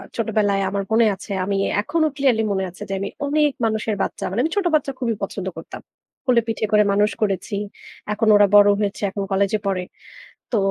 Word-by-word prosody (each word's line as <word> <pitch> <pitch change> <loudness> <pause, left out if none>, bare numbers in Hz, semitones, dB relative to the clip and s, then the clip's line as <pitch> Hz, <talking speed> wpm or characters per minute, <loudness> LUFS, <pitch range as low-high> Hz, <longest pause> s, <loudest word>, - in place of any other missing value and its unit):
ছোটবেলায় 210 -3 +1
আমার 200 +1 -2
মনে 225 +1 +4
আছে 200 +2 -11
আমি 200 +1 -1 0.3
এখনো 315 +8 +1
clearly 255 -5 +2
মনে 190 -1 0
আছে, 180 - -17
যে - - -2
আমি 195 - -3 0.2
অনেক 295 +1 +2
মানুষের 220 -1 -1
বাচ্চা, - - -3
মানে 195 +5 -3
আমি 320 - -1
ছোট 405 -2 0
বাচ্চা 280 -2 0
খুবই 235 -3 0
পছন্দ 195 -1 -4
করতাম। 165 - -9 0.5
কোলে 245 -2 +4
পিঠে 225 -1 -1
করে 210 0 +5
মানুষ 210 +2 +2
করেছি। 200 -1 -1 0.6
এখন 220 +1 0
ওরা 205 0 +6
বড় 205 0 +8
হয়েছে। 205 -1 -2
এখন 200 0 -3
কলেজে 200 +2 +1
পড়ে। 190 -2 -1 0.7
তো - - +2
210 Hz, 190 wpm, -21 LUFS, 200-230 Hz, 0.7 s, বড়